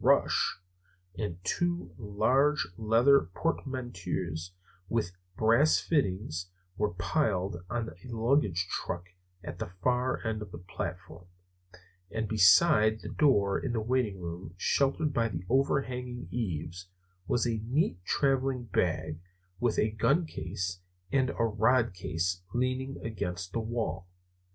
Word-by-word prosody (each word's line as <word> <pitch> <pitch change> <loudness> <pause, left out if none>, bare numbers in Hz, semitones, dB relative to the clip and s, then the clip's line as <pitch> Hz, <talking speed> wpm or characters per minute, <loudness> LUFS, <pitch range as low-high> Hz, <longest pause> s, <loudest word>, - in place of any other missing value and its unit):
Rush!" - - +3 0.6
and 105 -6 -3
two 175 - -1
large 125 +8 +2
leather 115 +1 +4
portmanteaus 90 - -3 0.4
with 110 -6 0 0.3
brass 115 +8 +5
fittings 95 - -1 0.3
were 105 -3 -1
piled 95 - 0
on 120 -2 -1
the - - -9
luggage 115 - +1
truck 90 -1 -4 0.3
at - - -7
the - - -3 0.2
far 125 0 +1
end 110 -1 -1
of 105 -3 -7
the - - -7
platform; 90 -1 -6 0.8
and 110 0 -2
beside 105 +2 +5
the - - -6
door 100 -10 +3
of 125 - -3
the 115 - +1
waiting 110 -4 0
room, 85 0 -7
sheltered 140 +7 +1
by 115 -1 +2
the 90 -3 -5
overhanging 125 -2 0
eaves, 90 -5 -3 0.4
was 120 - +2
a 115 -2 0
neat 120 - 0
traveling 135 +2 +1
bag, 85 -7 -1 0.4
with 120 -3 +1
a 110 - +2
gun 140 +10 +2
case 90 - -4 0.3
and 130 -1 +3
a 115 - -1
rod 115 +1 +3
case 90 0 -2
leaning 130 +2 -1
against 95 -4 -4
the - - 0
wall. 110 -5 -3
110 Hz, 125 wpm, -30 LUFS, 90-130 Hz, 0.8 s, brass